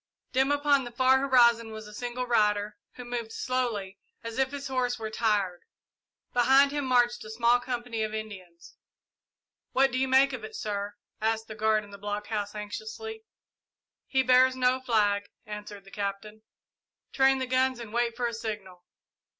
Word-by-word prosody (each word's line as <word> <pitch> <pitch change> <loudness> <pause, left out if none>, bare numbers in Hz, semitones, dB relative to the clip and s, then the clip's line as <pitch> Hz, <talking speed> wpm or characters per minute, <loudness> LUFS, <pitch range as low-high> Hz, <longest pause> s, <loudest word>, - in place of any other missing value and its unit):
Dim 265 +2 +2
upon 285 -1 +3
the 240 - -6
far 260 +2 +4
horizon 235 -4 +4
was 220 0 -8
a 210 - -11
single 245 +3 -4
rider, 210 -3 +1 0.2
who 250 - -9
moved 240 -2 -4
slowly, 225 -7 -2 0.2
as 230 +2 -5
if 265 0 +2
his 285 0 -6
horse 255 -2 -1
were 220 -1 -5
tired. 205 -6 0 0.7
Behind 265 +3 +5
him 290 -1 -2
marched 245 -1 +2
a 215 - -10
small 235 +2 +3
company 240 -2 -4
of 215 0 -1
Indians. 195 -6 -8 1.0
"What 270 +1 +4
do 255 - -1
you 265 - +1
make 265 +1 +4
of 245 -4 -5
it, 215 - -8
sir?" 205 -1 -4 0.3
asked 225 0 0
the 215 - -7
guard 215 0 +1
in 205 - -14
the 200 - -11
blockhouse, 205 0 -4
anxiously. 445 - -7 0.8
"He 265 -1 +2
bears 255 +1 +5
no 255 0 +2
flag," 205 -5 +1 0.2
answered 210 -1 -8
the 195 - -16
Captain. 205 +1 -5 0.7
"Train 270 0 +4
the 260 - -2
guns 255 0 +1
and 225 -2 -9
wait 235 -1 0
for 245 - -1
a 235 - -1
signal." 205 -5 -6
235 Hz, 170 wpm, -28 LUFS, 210-255 Hz, 1.0 s, Behind